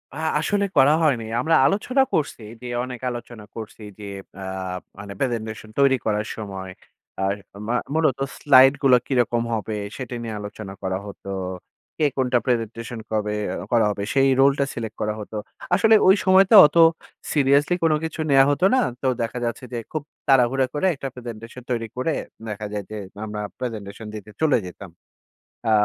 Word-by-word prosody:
আ - - -7 0.2
আসলে 205 -1 +1
করা 145 +3 +6
হয়নি, 125 -7 +2 0.2
আমরা 160 +4 +3
আলোচনা 215 - +2
করছি, 145 -6 -1 0.2
যে 125 - -7 0.2
অনেক 125 -1 -6
আলোচনা 120 -2 -8
করছি, 110 0 -8 0.2
যে 105 - -8 0.4
আ - - -6 0.6
মানে 100 0 -7
presentation 110 -3 -3
তৈরি 135 -1 +5
করার 105 0 0
সময় 95 -3 -6 0.5
আ - - +1 0.4
মু 120 - 0 0.2
মূলত 155 -5 +2 0.2
slide 135 -1 +6
গুলা 130 -2 +6
কিরকম 120 -3 +1
হবে 110 0 -3 0.2
সেটি 125 +2 -6
নিয়ে 115 -2 -5
আলোচনা 105 -1 -8
করা 95 0 -1
হতো। 100 -1 -10 0.7
কে 155 - +2
কোনটা 125 -1 +2
presentation 115 -1 -2
কবে 105 -1 -1 0.4
করা 115 -2 +4
হবে? 100 -1 -3
সেই 135 0 +4
role 135 +1 +6
টা 140 - +3
select 110 -2 -5
করা 105 0 0
হতো। 105 +1 -8 0.4
আসলে 220 0 +5
ওই 190 - +8
সময়তে 190 +3 +6
অত 150 - 0 0.6
seriously 145 +3 +3
কোনো 160 -2 +4
কিছু 160 0 -5
নেয়া 135 -1 +7
হতো 160 +6 +1
না, 260 - +4 0.2
তো 135 - 0
দেখা 115 +1 -3
যাচ্ছে 115 +2 -4
যে 120 - -2
খুব 155 -2 -3 0.2
তাড়াহুড়া 130 0 +4
করে 150 +5 -1
একটা 135 - -5
presentation 120 0 -9
তৈরি 115 -2 -1
করে 140 +5 0 0.4
দেখা 105 0 -5
যায় 105 -1 -3
যে 110 - -5 0.3
আমরা 105 0 -5 0.2
presentation 110 -3 -6
দিতে 105 0 -9
চলে 155 -5 +4
যেতাম। 90 +2 -10 0.8
আ - - +3
120 Hz, 165 wpm, -23 LUFS, 110-140 Hz, 0.8 s, ওই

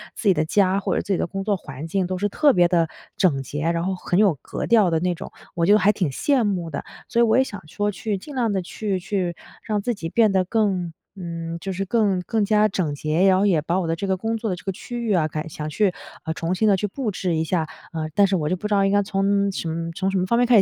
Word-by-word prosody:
自 215 - -3
己 - - +6
的 155 +1 +1
家 195 +2 +2
或 - - -1
者 - - +1
自 - - -5
己 190 - +2
的 - - 0
工 195 +2 -4
作 205 -2 +1
环 135 -1 -8
境 190 +2 0
都 185 0 -2
是 205 +2 0
特 290 +4 +4
别 175 -1 +5
地 170 -2 +3 0.3
整 155 -9 +2
洁， 145 +3 -5
然 170 0 -1
后 190 +1 -1
很 180 0 -1
有 200 -7 +4
格 - - -4
调 215 -6 +5
的 160 - +2
那 180 0 +1
种， - - -8 0.2
我 170 -1 +1
就 205 +3 +6
还 205 +1 +4
挺 185 -7 -1
羡 260 - +1
慕 180 -5 -1
的。 140 -3 -5 0.2
所 235 - 0
以 235 - +6
我 225 +2 +4
也 260 - +5
想 200 -10 -9
说 205 +5 -1
去 205 0 -3
尽 280 +8 -10
量 230 -5 +1
地 190 - 0
去 195 +1 -3
去， 180 -2 -2 0.3
让 210 -2 -1
自 240 +3 -1
己 165 -5 -5
变 220 0 +3
得 185 -1 +2
更， 185 -5 0 0.2
嗯， 170 -2 -5
就 195 - -4
是 195 +2 -2
更 200 -4 +1
更 220 +2 0
加 215 0 +4
整 175 -7 -1
洁， 155 +5 +1
然 185 -1 +5
后 200 - +3
也 175 -6 +3
把 170 +5 0
我 170 - -2
的 165 - 0
这 200 - -4
个 190 -1 +1
工 225 +3 -2
作 220 -1 -3
的 185 - -1
这 - - -12
个 195 - 0
区 240 +5 -6
域 215 - +1
啊， 160 -4 +2
改 155 +2 -4
想 155 -1 -5
去 190 +3 +1 0.4
重 165 +2 -2
新 215 +4 +1
地 200 - +5
去 190 - -2
布 235 +2 -3
置 180 -3 -1
一 160 - +1
下。 165 -2 0 0.3
嗯， 155 -1 -3
但 200 -1 +5
是 190 - +1
我 150 -3 -1
就 185 - 0
不 210 - -4
知 210 - -1
道 200 - +4
应 195 - +2
该 205 0 +4
从 200 0 +1
什 165 -1 -3
从 190 0 0
什 195 - 0
么 180 - +1
方 235 +5 +1
面 245 - +4
开 230 -4 +7
190 Hz, 310 characters per minute, -23 LUFS, 170-210 Hz, 0.4 s, 开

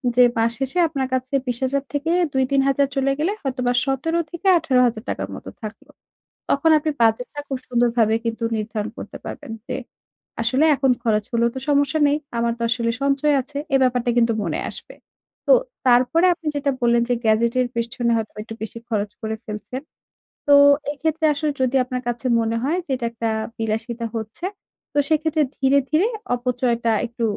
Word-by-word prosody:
যে 250 - +7
মাস 225 +1 +2
শেষে 270 +5 -2
আপনার 275 -4 -2
কাছে 255 +1 -2
২০,০০০ 260 +3 0
থেকে, 295 +3 -1 0.2
2-3 265 +1 +2
হাজার 275 0 +3
চলে 275 0 +2
গেলে 325 +6 +1
হয়তোবা 255 -2 -1
১৭ 270 +5 -1 0.2
থেকে 345 +3 -4
১৮,০০০ 250 -7 +2
টাকার - - -3
মতো - - -9
থাকলো। 215 0 -9 0.6
তখন 285 +4 +3
আপনি 310 +1 -1
বাজেটটা 230 +6 +1
খুব 270 - -2
সুন্দরভাবেই 235 -2 +2
কিন্তু 230 0 -3
নির্ধারণ 215 0 -3
করতে - - -8
পারবেন - - -7
যে, - - -3 0.7
আসলে 255 +6 +2
এখন 270 -1 +2
খরচ 215 -3 +1
হলেও 235 0 +2
তো 260 - -4
সমস্যা 285 +2 +2
নেই। 285 - +2 0.2
আমার 235 0 +1
তো 235 - -5
আসলে 230 0 0
সঞ্চয় 280 +1 +2
আছে। 280 +3 -12 0.2
এ - - +7
ব্যাপারটা 250 -1 +2
কিন্তু 230 -1 +4
মনে - - -2
আসবে। - - -9 0.5
তো - - +6 0.3
তারপরে 250 +8 +4
আপনি 330 -2 -16
যেটা 285 0 +1
বললেন 235 0 +4
যে 245 - +2
গ্যাজেটের 235 +3 +2
পেছনে 235 +1 -1
হয়তোবা 220 -1 -4
একটু 225 - -8
বেশি 220 +1 -6
খরচ 210 -3 -1
করে 220 -1 -3
ফেলছেন। 210 +4 -6 0.7
তো 285 - +6 0.4
এক্ষেত্রে 315 +2 -1
আসলে 295 +1 -1
যদি 255 +1 +1
আপনার 250 0 -4
কাছে 240 +2 -3
মনে 225 0 0
হয় 305 +6 +1
যে - - -6
এটা 245 -2 -4
একটা 230 -1 -2 0.3
বিলাসিতা 225 +2 -3
হচ্ছে, 220 +9 -5 0.5
তো - - -3
সেক্ষেত্রে 315 0 +2
ধীরে, 270 +1 +4
ধীরে 320 +8 +3 0.3
অপচয়টা 240 -1 0
একটু 235 0 -6
250 Hz, 170 wpm, -22 LUFS, 230-280 Hz, 0.7 s, যে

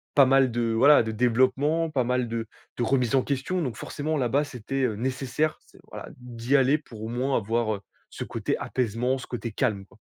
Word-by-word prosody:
pas 140 - +7
mal 135 0 +4
de 115 -1 0
voilà, 140 +4 +6
de 110 - -3
développement, 130 +8 +2
pas 135 -4 +1
mal 125 0 0
de 115 -1 -3 0.3
de 120 - 0
remise 125 -1 +1
en 130 - +4
question. 145 +6 -2
Donc, 125 -8 -3
forcément, 155 +2 -3
là-bas, 135 +2 +1
c'était, 135 0 -4
heu, 110 - -1
nécessaire, 130 +6 -1
c'est, - - -20
voilà, - - -8
d'y 125 +1 -2
aller 135 +2 +4
pour 115 -7 -11
au 110 - -4
moins 130 +3 0
avoir, 110 0 0
heu, 100 - -10 0.3
ce - - -6
côté - - -2
apaisement, 125 +2 -1
ce - - -9
côté 120 -2 -5
calme 105 -3 -1
quoi. 110 - -22
125 Hz, 210 wpm, -26 LUFS, 115-135 Hz, 0.3 s, pas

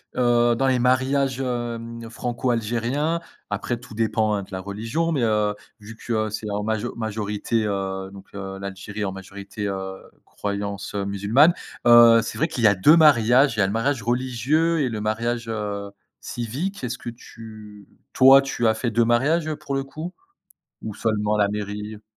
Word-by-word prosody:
heu, 120 -1 +3
dans 135 +3 +1
les 130 -1 +2
mariages, 130 +1 +1
hem, 115 -2 -4
franco-algériens, 120 +6 -1 0.3
après 105 +4 -2
tout 120 -1 -13
dépend, 110 -1 +1
hein, 100 - -3
de - - -14
la 95 - -4
religion, 115 - -2
mais, 145 -5 0
heu, 105 -2 +1 0.3
vu 110 +2 -11
que, 120 - -4
heu, 110 -1 0
c'est 105 0 -5
en 105 0 -2
majo 110 +2 -2
majorité, 110 0 -2
heu, 95 -1 -3
donc, 100 -1 -12
heu, 95 -1 -6
l'Algérie 100 +2 -6
en 95 - -2
majorité, 100 +2 -7
heu, 95 -1 -4 0.3
croyance, 100 -1 -5
heu, 100 - -1
musulmane, 105 - +3 0.3
heu, 120 -1 +8
c'est 115 - -6
vrai 160 - +1
qu'il 125 - -4
y - - +8
a 100 - +4
2 120 - +6
mariages. 135 -5 +5
Il - - -1
y - - +5
a - - +2
le 100 - -3
mariage 120 +3 0
religieux 130 +8 +1
et 140 - +1
le 110 -3 -4
mariage, 115 +2 -2
heu, 105 -2 -4 0.3
civique. 135 - -4
Est-ce 125 +1 -4
que - - -7
tu 110 -3 -12 0.3
toi, 135 +1 +8
tu 135 -3 -2
as 110 - +4
fait 115 +1 -2
2 115 +1 +3
mariages, 135 +8 +2
heu, 155 - -3
pour 150 -2 -4
le 135 - -1
coup? 155 +6 -7 0.7
Ou 110 - -5
seulement 105 -1 0
la 105 -1 +3
mairie? 105 +1 -5
115 Hz, 185 wpm, -23 LUFS, 105-125 Hz, 0.7 s, heu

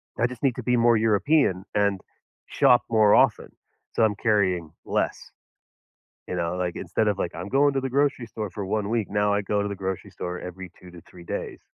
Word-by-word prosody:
that - - -2
I - - +4
just 125 0 -10
need 130 -3 +2
to 125 - -6
be 125 +1 +2
more 115 -1 +4
European 110 - +2
and 100 -2 +1 0.5
shop 125 - +4
more 110 -2 +5
often, - - +3 0.4
so - - +2
I'm 105 -2 +2
carrying 95 -7 +1
less, - - -2 1.0
you - - -4
know, 85 0 -2
like, 90 -1 -2
instead 110 - -1
of, 100 -2 0
like, 85 - -3
I'm 90 - -6
going 140 +4 +3
to 135 - +1
the 135 0 -3
grocery 140 -2 +1
store 110 -2 -5
for 100 0 -5
1 105 +1 -1
week, 115 -2 -1
now 105 0 +1
I 100 0 +1
go 100 +1 0
to 100 - -2
the 100 - -5
grocery 95 -1 -4
store 90 0 -5
every 90 0 -8
2 90 - -13
to 90 -1 -12
3 85 0 -15
days. - - -5
105 Hz, 220 wpm, -25 LUFS, 95-115 Hz, 1.0 s, more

